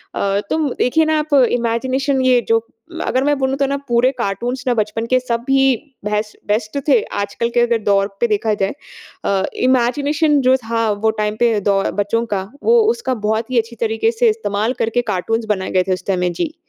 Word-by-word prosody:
अ, 200 0 0
तो - - 0 0.2
देखिए 315 +6 +2
ना 315 0 +1
आप 300 0 -4 0.2
इमेजिनेशन 260 +3 0
ये 250 -1 +4
जो 225 0 +4 0.5
अगर 260 +1 +1
मैं 290 0 +2
बोलूँ 265 0 0
तो 275 - +1
ना, 280 0 -1
पूरे 240 +2 +3
कार्टून्स 240 +4 -2
ना 245 - +3
बचपन 220 +1 -1
के 255 - +4
सब 240 -1 -3
ही 270 -1 +4 0.3
बेस्ट 210 0 -2
बेस्ट 215 +5 -1
थे, 245 -6 +5
आजकल 205 +3 -3
के - - +4
अगर 240 -1 +2
दौर 200 -1 +2
पे 235 - +3
देखा 215 0 0
जाए। 195 -1 -1 0.5
अ, 195 -1 +1 0.3
इमेजिनेशन 285 +4 +2
जो 260 +1 +4
था, 230 -2 -1
वो 215 +2 +1
टाइम 210 0 -1
पे 230 -3 +3
दौ 195 -1 +3 0.2
बच्चों 230 +3 -1
का, 190 +1 -4
वो 465 0 +5
उसका 460 - -2
बहुत 220 +4 -1
ही 250 - 0
अच्छी 230 +1 -4
तरीके 225 +1 +1
से 235 0 +2
इस्तेमाल 215 +2 -1
करके 230 +2 0
कार्टून्स 225 +5 -1
बनाए 190 - -5
गए 185 -1 +2
थे 185 - +2
उस 185 - -6
टाइम 190 -2 0
में। 180 -1 0
जी। 315 - -3
230 Hz, 205 wpm, -18 LUFS, 210-260 Hz, 0.5 s, थे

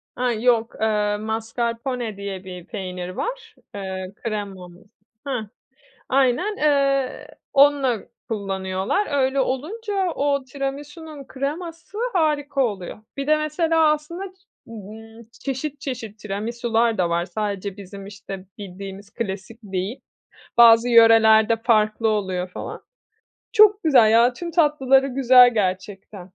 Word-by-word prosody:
A, 250 0 0
yok, 230 0 +1
ııı, 210 -1 +1
mascarpone 230 +1 -3
diye 195 -2 -6
bir 180 -2 -9
peynir 180 -1 -6
var, 460 - -5 0.2
eee, 190 -1 -5
kremamız 195 -5 -6 0.4
Heh. 255 -5 -2 0.7
Aynen, 275 - +1
eee, 275 -1 +1 0.3
onunla 275 -4 +4 0.3
kullanıyorlar. 195 - -2
Öyle 270 -1 +1
olunca 380 - -2
o 280 -1 0
tiramisunun 285 +2 -7
kreması 330 +8 -6
harika 295 -5 0
oluyor. 200 -4 -4 0.2
Bir 275 0 -3
de 305 0 +4
mesela 310 +1 +2
aslında, 335 +5 -5 0.4
ımm, 225 +1 -11 0.2
çeşit 275 +1 -4
çeşit 225 -6 -6
tiramisular 225 +2 -1
da 175 -2 +1
var, 170 +1 0
sadece 200 +1 -4
bizim 195 0 -10
işte 195 -1 -9
bildiğimiz 195 +1 -9
klasik 205 0 -5
değil, 195 +4 -4 0.6
bazı 235 0 +7
yörelerde 225 -1 +6
farklı 220 -1 +2
oluyor 185 -4 -2
falan. - - -8 0.7
Çok 425 -2 +6
güzel 245 -8 +5
ya, 235 +2 +5
tüm 340 +5 -6
tatlıları 275 -5 +3
güzel 250 -2 +6
gerçekten. 190 -1 -3
230 Hz, 115 wpm, -22 LUFS, 200-280 Hz, 0.7 s, bazı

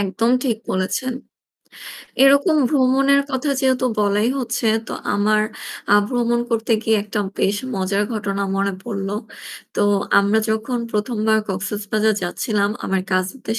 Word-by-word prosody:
একদম 215 +4 0
ঠিক 235 -5 +1
বলেছেন। 200 +7 -1 1.1
এরকম 285 +4 +5
ভ্রমণের 275 0 +3
কথা 265 +2 -1
যেহেতু 260 -1 +2 0.2
বলাই 205 +2 +2
হচ্ছে 240 -2 -2 0.2
তো - - -5 0.2
আমার 215 +1 +2 0.5
আ - - +8
ভ্রমণ 240 -1 +1
করতে 230 0 0
গিয়ে 220 -1 +2
একটা 210 0 -3 0.2
বেশ 200 +1 +1 0.2
মজার 195 +2 0
ঘটনা 200 -1 -2
মনে 200 0 0
পড়লো। 195 -3 -4 0.6
তো - - +1 0.4
আমরা 200 +2 +3
যখন 225 +3 -1
১ম 210 +2 -1
বার 220 0 +4
কক্সেসবাজার 210 +2 -1
যাচ্ছিলাম 200 +3 -1
আমার 190 -1 0
কাজিনদের 195 +5 -1
215 Hz, 135 wpm, -20 LUFS, 200-245 Hz, 1.1 s, আ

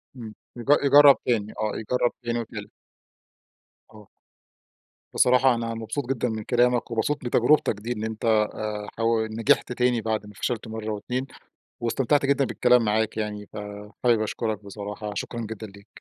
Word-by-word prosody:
امم 115 -3 -8 0.2
ي - - -6 0.2
يجرب 140 0 +8
تاني، 110 -4 0
آه 110 -1 0
يجرب 120 +2 0
تاني 120 0 -1
وتالت. 115 - -7 1.2
آه. 105 -1 -16 1.0
بصراحة 125 0 +4
أنا 115 0 -3
مبسوط 115 +5 -4
جدًا 125 -2 0
من 110 -1 -4
كلامك، 120 0 +1
ومبسوط 130 +5 -1
من 120 - -3
تجربتك 125 +2 +3
دي، 115 +3 -5
إن 110 -3 -3
أنت 110 0 -4
آآ 105 -1 0
ح 115 - -4 0.3
نجحت 120 +5 +2
تاني 125 -2 +1
بعد 110 -1 -2
ما 105 - -12
فشلت 115 +3 -3
مرّة 110 0 -5
واتنين، 125 +5 -3 0.5
واستمتعت 135 +4 +1
جدًا 140 0 +2
بالكلام 125 -2 +3
معاك 110 +1 0
يعني، 105 -1 -4
فحابب 105 +3 -2
أشكرك 110 -1 -3
بصراحة 105 +1 -6
شكرًا 120 +3 -4
جدًا 110 -1 -6
ليك. 100 0 -16
115 Hz, 155 wpm, -25 LUFS, 105-125 Hz, 1.2 s, يجرب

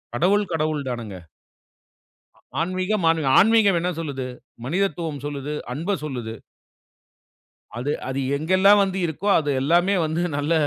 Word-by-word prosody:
கடவுள், 200 +11 +3
கடவுள் 155 -3 -1
தானுங்க. 115 -6 -5 1.4
ஆன்மீகம், 185 +3 -1
ஆனு 165 - +1 0.2
ஆன்மீகம் 205 -3 +5
என்ன 180 +2 -1
சொல்லுது? 140 -5 -4 0.4
மனிதத்துவம் 165 -2 -2
சொல்லுது! 145 0 -4 0.2
அன்ப 170 +9 -2
சொல்லுது! 120 -6 -5 1.4
அது 145 +4 -1 0.2
அது 135 +1 -2 0.2
எங்கெல்லாம் 185 +7 +4
வந்து 190 -1 -3
இருக்கோ, 170 +6 -4
அது 150 -2 -1
எல்லாமே 175 +7 +3
வந்து 160 +2 -1
நல்ல 145 +3 -1
160 Hz, 120 wpm, -23 LUFS, 145-185 Hz, 1.4 s, ஆன்மீகம்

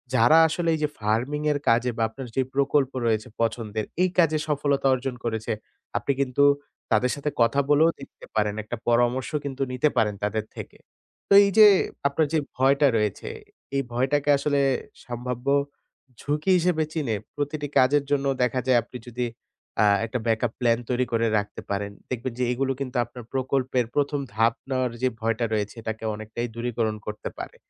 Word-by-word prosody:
যারা 120 +8 +6
আসলে 165 +1 -1
এই - - -5
যে - - +3
farming 120 +8 -1
এর 145 - 0
কাজে 120 +2 +3
বা 115 - +1
আপনার 130 +2 -8
যে 135 - +3
প্রকল্প 140 -1 +2
রয়েছে 110 0 +1
পছন্দের, 110 -2 -1 0.2
এই 185 - +3
কাজে 155 -2 +4
সফলতা 145 -2 +1
অর্জন 130 0 -2
করেছে, 110 -1 -2 0.5
আপনি 140 - 0
কিন্তু 135 +1 +2 0.5
তাদের 115 +3 +3
সাথে 145 +1 -2
কথা 115 +4 +3
বলেও 155 +3 +5
দেখতে 135 - -12
পারেন, 105 -1 +1
একটা 115 +3 -5
পরামর্শ 120 +3 +2 0.2
কিন্তু 135 -1 -5
নিতে 125 +4 +2
পারেন 105 -2 +2
তাদের 110 +1 -1
থেকে। - - -8 0.5
তো - - +5
এই - - +2
যে 215 - +11 0.4
আপনার 150 +2 +1
যে 160 - +3 0.2
ভয়টা 140 +2 +4
রয়েছে, 105 -2 -2 0.5
এই 140 - +2
ভয়টাকে 140 +4 +1
আসলে 140 0 0 0.5
সম্ভাব্য 125 +1 -5 0.7
ঝুঁকি 150 +5 0
হিসেবে 170 -2 +1
চিনে, 140 -9 -1 0.2
প্রতিটি 145 +1 -3
কাজের 140 +3 +4
জন্য 140 -1 +1 0.2
দেখা 125 +1 +1
যায় 125 -2 +5
আপনি 125 - -9
যদি 125 +1 -2 0.6
আ - - +5 0.2
একটা 120 +2 -3
backup 115 0 +1
plan 115 -2 +3
তৈরি 125 0 +1
করে 115 0 +2
রাখতে 105 0 -4
পারেন 100 0 -2 0.2
দেখবেন 125 0 -3
যে 125 - +1
এগুলো 135 +2 0
কিন্তু 130 -2 -3
আপনার 120 0 -11
প্রকল্পের 130 -2 0
১ম 145 0 +1 0.2
ধাপ 115 +1 +3 0.2
নেওয়ার 130 -2 0
যে 130 - +3
ভয়টা 115 +1 0
রয়েছে 105 -1 -2
এটাকে 110 0 -5
অনেকটাই 110 +3 -5
দূরীকরণ 115 -2 -1
করতে 105 - -5
পারে। - - -7
125 Hz, 170 wpm, -25 LUFS, 115-140 Hz, 0.7 s, যে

